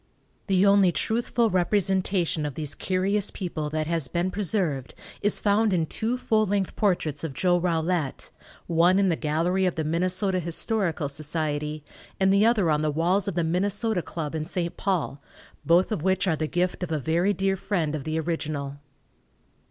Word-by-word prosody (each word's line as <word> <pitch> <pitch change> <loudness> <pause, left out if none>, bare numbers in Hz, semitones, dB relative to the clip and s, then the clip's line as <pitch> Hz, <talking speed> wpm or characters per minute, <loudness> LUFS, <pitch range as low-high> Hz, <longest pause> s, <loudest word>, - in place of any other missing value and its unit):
The 190 -1 +3
only 200 -2 +5
truthful 230 +2 0
representation 185 -2 +1
of 145 -2 -4
these 150 -3 -2
curious 195 +2 0
people 165 -5 -4
that 155 0 -2
has 165 -3 -1
been 175 +7 -1
preserved 175 - -1 0.3
is 205 - +3
found 210 0 +2
in 165 -3 +1
two 225 +9 -2
full 215 -3 +1
length 195 -1 -1
portraits 165 -8 0
of 150 -5 -5
Joe 180 -1 +2
Rollette, 165 -3 -1 0.3
one 170 +3 +3
in 195 -1 +3
the 165 - +2
gallery 170 +5 0
of 180 - -2
the 160 - -2
Minnesota 185 +4 +1
Historical 170 -1 0
Society 150 0 -2 0.4
and 190 0 +3
the 205 +3 +4
other 205 -8 +2
on 150 0 +1
the 155 - 0
walls 175 +6 +1
of 195 - -2
the 170 - +1
Minnesota 195 +4 0
Club, 160 -3 -5
in 160 -1 -2
St. 170 +1 -2
Paul, 170 -7 -2 0.4
both 175 +5 +3
of 210 - -1
which 190 +2 +1
are 165 - +2
the 155 0 -2
gift 180 +3 -1
of 180 -3 -4
a 155 - +1
very 165 +7 +1
dear 195 0 0
friend 175 -5 -2
of 150 -3 -4
the 155 +2 -2
original. 150 -4 -3
175 Hz, 175 wpm, -25 LUFS, 155-195 Hz, 0.4 s, only